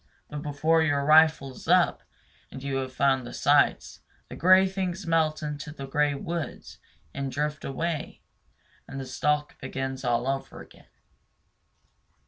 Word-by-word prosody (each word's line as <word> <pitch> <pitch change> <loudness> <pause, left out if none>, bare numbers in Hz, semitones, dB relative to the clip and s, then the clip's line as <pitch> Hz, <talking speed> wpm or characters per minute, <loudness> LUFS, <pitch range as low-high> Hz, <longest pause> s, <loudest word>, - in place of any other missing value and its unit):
But 150 -1 -5
before 155 +2 +1
your 145 -3 +1
rifle 155 -2 +5
is 130 - -13
up - - +3 0.5
and 135 - -10
you 140 -1 -2
have 130 -1 -3
found 135 -1 +2
the 120 - -9
sights, - - +2 0.3
the - - -8
gray 185 +2 +5
things 190 0 -3
melt 160 -2 +1
into 150 0 -5
the 140 -3 -8
gray 145 +1 +1
woods 170 +3 -6 0.3
and 135 -1 -4
drift 150 +2 -3
away; 160 +3 -4 0.6
and 135 - -7
the 135 - -5
stalk 150 +3 -1
begins 135 0 -5
all 120 +1 0
over 135 0 -3
again. - - -15
145 Hz, 145 wpm, -27 LUFS, 135-160 Hz, 0.6 s, rifle